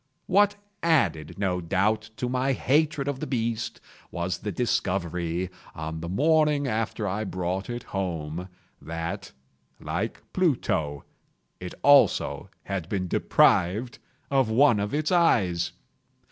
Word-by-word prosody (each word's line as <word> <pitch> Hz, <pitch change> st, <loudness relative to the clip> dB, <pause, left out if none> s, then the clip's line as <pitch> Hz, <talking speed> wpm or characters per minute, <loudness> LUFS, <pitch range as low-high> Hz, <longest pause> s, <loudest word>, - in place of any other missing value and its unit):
What 205 Hz, +2 st, +4 dB, 0.3 s
added, 85 Hz, -, +1 dB
no 95 Hz, -2 st, 0 dB
doubt, 105 Hz, +6 st, 0 dB
to 125 Hz, -, -2 dB
my 130 Hz, +2 st, +1 dB
hatred 145 Hz, +2 st, +1 dB
of 140 Hz, -2 st, -2 dB
the -, -, -4 dB
beast, 115 Hz, -3 st, -2 dB, 0.3 s
was 85 Hz, +1 st, -3 dB
the 105 Hz, -, -4 dB
discovery, 90 Hz, -6 st, -1 dB, 0.2 s
on 80 Hz, +1 st, -5 dB
the 85 Hz, +1 st, -5 dB
morning 150 Hz, -, +3 dB
after 110 Hz, -2 st, -1 dB
I 100 Hz, +3 st, -1 dB
brought 95 Hz, +1 st, -3 dB
it 120 Hz, 0 st, -4 dB
home, 90 Hz, -2 st, -4 dB, 0.3 s
that, 85 Hz, +5 st, -5 dB, 0.5 s
like -, -, -3 dB
Pluto, 80 Hz, -, 0 dB, 0.5 s
it 90 Hz, -, -7 dB
also 145 Hz, -1 st, +4 dB
had 95 Hz, -4 st, -4 dB
been 95 Hz, -3 st, -1 dB
deprived 100 Hz, +7 st, +2 dB, 0.3 s
of 135 Hz, -4 st, +3 dB
one 120 Hz, -1 st, +5 dB
of 100 Hz, +1 st, -2 dB
its 155 Hz, +3 st, 0 dB
eyes. 100 Hz, -, +3 dB
100 Hz, 125 wpm, -26 LUFS, 90-135 Hz, 0.5 s, one